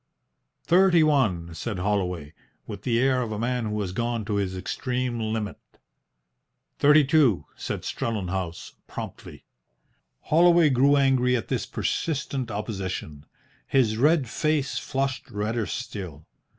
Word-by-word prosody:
"Thirty 175 -1 +5
one," 105 - +1
said 105 +5 -4
Holloway, 90 -6 -2 0.3
with - - -7
the 115 -2 0
air 130 0 +2
of 115 -3 -3
a 105 - -3
man 120 +1 -1
who 105 0 -2
has 95 -3 -3
gone 115 +2 -2
to 105 -1 -1
his 95 -2 -2
extreme 125 +4 -2
limit. 110 -1 -3 1.2
"Thirty 150 +1 +6
two," 130 - +3
said - - -5
Strellenhaus, 95 -6 -3
promptly. - - -8 0.8
Holloway 170 -1 +5
grew 135 +3 +4
angry 130 -2 +3
at 110 - -6
this - - -1
persistent 140 -5 -2
opposition. 95 -8 -5 0.4
His 120 -5 +2
red 145 +3 +3
face 150 +3 0
flushed 135 -1 -3
redder 105 +1 -2
still. 85 -7 -6
115 Hz, 125 wpm, -25 LUFS, 100-135 Hz, 1.2 s, Thirty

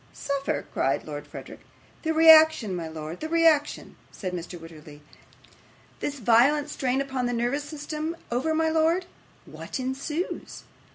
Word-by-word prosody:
'Suffer!' 280 -1 -3
cried 135 +2 0
Lord 145 -1 -7
Verisopht. - - -10 0.4
'The 320 - -1
reaction, 315 - +6
my 170 -2 -4
lord, 160 +1 -7
the 315 - -5
reaction,' 325 -3 +2
said 185 -3 -6
Mr. 175 0 -6
Wititterly. 155 -2 -13 1.0
'This 290 0 -3
violent 270 +6 +3
strain 260 -1 0
upon 265 -2 -2
the 245 - -2
nervous 245 +5 -1
system 305 +2 -5 0.2
over, 265 +7 0
my 320 0 +2
lord, 325 +3 +2 0.4
what - - -7
ensues? 275 +7 -4
275 Hz, 135 wpm, -26 LUFS, -, 1.0 s, reaction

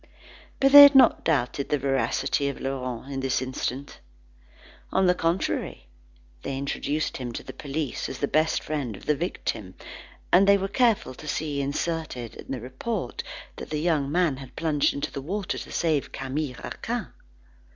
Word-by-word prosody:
But 275 0 +4
they 285 +1 +13
had 285 0 +10
not 265 - +6
doubted 140 -3 0
the 150 - +2
veracity 135 +1 0
of 140 - -6
Laurent 130 -3 -4
for 140 - -10
an 135 -1 -3 0.3
instant. 130 +1 -4 0.9
On 190 - +3
the 180 - +5
contrary, 165 - -2 0.5
they 135 - -4
introduced 145 +2 -2
him 125 -2 -5
to - - -6
the - - -9
policeman 145 -1 -4
as - - -10
the 140 - 0
best 155 +3 +1
friend 140 -9 -3
of - - -14
the 150 - +3
victim, 120 - -4 0.6
and 195 +2 +6
they 200 0 +7
were 195 0 -2
careful 225 - +2
to 155 - -11
see 145 -1 -2
inserted 145 -4 -3
in - - -10
the 135 - -2
report, 130 - -4 0.4
that - - -8
the 150 - -2
young 150 -4 +1
man 170 -5 +2
had 135 -1 -11
plunged 150 -3 +1
into 140 - -4
the 140 - -5
water 190 +6 -3
to - - -9
save 155 -4 0
Camille 135 0 -3
Raquin. - - -4
145 Hz, 170 wpm, -26 LUFS, 135-170 Hz, 0.9 s, they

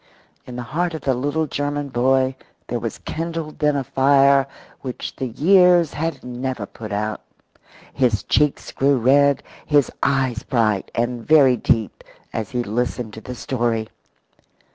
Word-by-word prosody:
In 125 - -8
the 125 - -4
heart 170 +6 -2
of 160 - -6
the 135 - +1
little 145 +5 -1
German 145 0 -3
boy 130 +1 +2 0.3
there - - -3
was - - -4
kindled 165 -1 -5
then 150 -1 +2
a 140 - 0
fire 135 +1 +4 0.3
which 130 -2 -6
the 130 - -3
years 175 - +4
had 165 +2 -3
never 125 -2 -4
put 110 +1 -9
out. 105 +1 -2 0.7
His 120 -7 +1
cheeks 150 -1 +1
grew 140 0 +2
red, 140 +3 +3 0.2
his 145 -3 +2
eyes 130 -4 +1
bright 110 -7 0
and 120 0 -1
very 140 -4 +5
deep 110 -3 -1 0.3
as 110 -3 -3
he 125 -1 -2
listened 120 0 -3
to 110 - -9
the 125 - -7
story. 115 -3 -2
130 Hz, 150 wpm, -21 LUFS, 120-145 Hz, 0.7 s, very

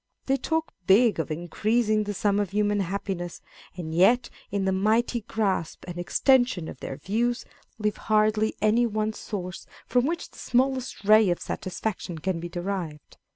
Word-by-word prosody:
They 270 0 +2
talk 320 +4 -2
big 215 +1 +5
of 160 - -2
increasing 215 +7 0
the 205 0 -3
sum 205 +1 +1
of 205 -3 0
human 205 +1 +1
happiness, 190 -2 -3 0.4
and 160 -3 -5
yet 230 +9 +4 0.2
in 200 -1 -1
the 190 - +2
mighty 220 +5 +1
grasp 200 -6 -2
and 175 -1 -6
extension 245 - +2
of 130 - -8
their 135 - -6
views, 235 +9 -1 0.3
leave 210 -1 -1
hardly 215 0 +2
any 230 +3 +4
one 215 0 -1
source 185 -5 -6 0.2
from 245 +2 +2
which 335 +2 -3
the - - -15
smallest 260 -3 0
ray 215 -1 +6
of 175 - 0
satisfaction 185 -2 -4
can 175 +2 -2
be 175 +1 -6
derived. 175 -4 -5
205 Hz, 160 wpm, -26 LUFS, 180-230 Hz, 0.4 s, ray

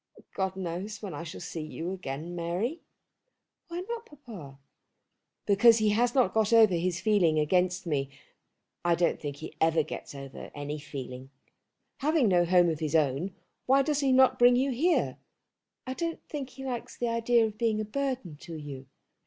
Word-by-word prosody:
God 190 -1 -1
knows 190 +4 -5
when 195 -5 -5
I 145 - -5
shall 165 -2 -8
see 165 - -5
you 165 +3 -5
again, 170 -2 -5
Mary." 180 - -2 0.9
"Why 345 +1 -4
not, 460 +4 -6
papa?" 215 - -11 0.9
"Because 220 +3 +6
he 215 -1 +2
hasn't 240 +4 +2
got 220 -1 +2
over 225 -4 +6
his 175 0 0
feeling 190 -6 +3
against 180 +4 +1
me. 140 -4 -1 0.7
I 175 -1 +3
don't 175 0 +1
think 145 -2 -4
he 155 +2 -9
ever 160 -1 +4
gets 145 - -8
over 135 -1 -8
any 145 +1 -4
feeling. 130 -3 -8 0.7
Having 295 -5 +2
no 175 -2 +4
home 175 0 +4
of 160 -2 -2
his 155 -1 -1
own 155 +5 +1 0.3
why 270 +1 +5
does 295 0 0
he 275 -2 +2
not 260 0 +5
bring 245 0 +7
you 265 +2 +2
here?" 325 +8 +1 0.7
"I 260 - -3
don't 335 +3 -4
think 280 -3 -5
he 270 +1 -9
likes 245 -3 -5
the 240 - -1
idea 230 0 +3
of 215 -1 -6
being 225 -2 +1
a 215 - -2
burden 255 - -3
to 165 +2 -9
you." 140 -4 -8
190 Hz, 175 wpm, -29 LUFS, 160-245 Hz, 0.9 s, bring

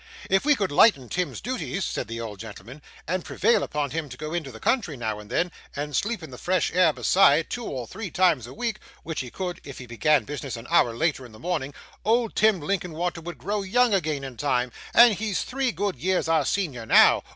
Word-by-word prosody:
'If 195 +7 +3
we 295 -1 +5
could 200 - -1
lighten 145 - +5
Tim's 180 -1 -2
duties,' 245 -6 -3
said - - -3
the 115 +1 -5
old 110 -4 -6
gentleman, 115 +6 -10 0.3
'and 180 +2 -1
prevail 230 +4 +2
upon 145 -3 -2
him 160 0 -3
to 125 - -9
go 155 +2 -5
into 160 -6 -3
the 115 - -11
country, 170 - 0
now 110 -3 -3
and 105 0 -12
then, 170 +8 0 0.2
and 145 0 -4
sleep 225 -3 -1
in 160 - -9
the 125 - -10
fresh 185 -1 0
air, 180 -2 +5
besides, 160 -2 +4
two 240 -1 -4
or 125 -3 -4
three 210 - -6
times 170 -9 +2
a - - -10
week 230 -2 -2 0.2
(which 160 -1 -4
he 125 - -4
could, 180 +4 -5
if 140 - -9
he 125 - -8
began 135 +3 +2
business 140 0 -5
an 115 - -9
hour 115 -1 +4
later 155 0 0
in 120 -3 -12
the - - -12
morning), 150 -2 -2 0.3
old 230 +1 +1
Tim 215 -3 +4
Linkinwater 175 0 -2
would 175 +1 -7
grow 205 +1 -2
young 235 +4 +2
again 155 -7 0
in 130 -3 -7
time; 125 -3 0 0.2
and 235 -1 +7
he's 210 -1 -2
three 265 -1 -1
good 195 +2 -2
years 185 -2 0
our 165 -1 +2
senior 140 - -2
now. - - +6
165 Hz, 225 wpm, -25 LUFS, 130-195 Hz, 0.3 s, and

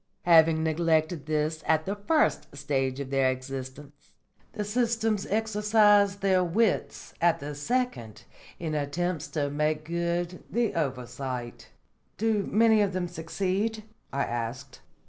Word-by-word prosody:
Having 160 -2 +5
neglected 160 -1 +1
this 155 +1 -1
at 160 0 +2
the 200 - -2
first 205 - 0
stage 135 -2 -1
of 140 -1 -5
their 135 -1 +3
existence, 135 +2 -7 0.4
the 210 - -3
systems 225 -1 0
exercise 210 -1 +3
their 190 -2 +2
wits 200 +5 0
at 170 -1 +3
the 145 +1 -6
second 145 - -2 0.3
in 160 -2 -4
attempts 155 +3 -2
to 145 -2 -2
make 150 +1 -1
good 170 +1 -2
the 235 -1 0
oversight." 130 -4 -4 0.5
"Do 215 -2 0
many 220 0 +5
of 200 -2 +1
them 180 -1 -1
succeed?" 190 +6 -2 0.3
I 140 0 0
asked. 120 +2 -5
165 Hz, 125 wpm, -27 LUFS, 145-205 Hz, 0.5 s, Having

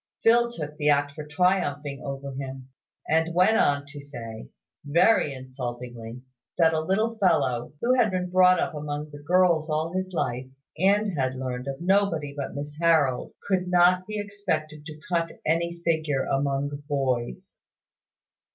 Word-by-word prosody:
Phil 235 +1 +4
took 150 -8 -7
the 150 0 +1
act 145 0 +3
for 150 +1 -8
triumphing 150 -4 0
over 140 -1 -5
him, 130 -1 -7 0.4
and 165 +2 +1
went 185 +5 +5
on 140 -7 +2
to 145 0 -9
say, 115 - -9 0.3
very 155 +3 +3
insultingly, 125 -2 -7 0.3
that 165 -2 +4
a 160 - +1
little 215 +7 0
fellow 145 - +1
who 245 +2 +3
had 245 -4 +3
been 185 -1 -2
brought 185 -1 +5
up 175 - -1
among 150 0 -5
the 145 - -10
girls 170 0 +3
all 155 +2 -1
his 185 0 -2
life, 130 -7 -2 0.3
and 200 +2 +2
had 130 -2 -1
learned 130 0 -4
of 135 0 -4
nobody 175 -6 +1
but 140 -1 -5
Miss 145 +1 -6
Harold, 155 -7 +2
could 185 -2 +1
not 180 +1 +4
be 215 0 -4
expected 160 -7 -3
to 155 -1 -9
cut 170 -2 -1
any 170 +2 0
figure 155 -5 +1
among 140 0 0 0.2
boys. 130 - -2
155 Hz, 155 wpm, -26 LUFS, 140-180 Hz, 0.4 s, went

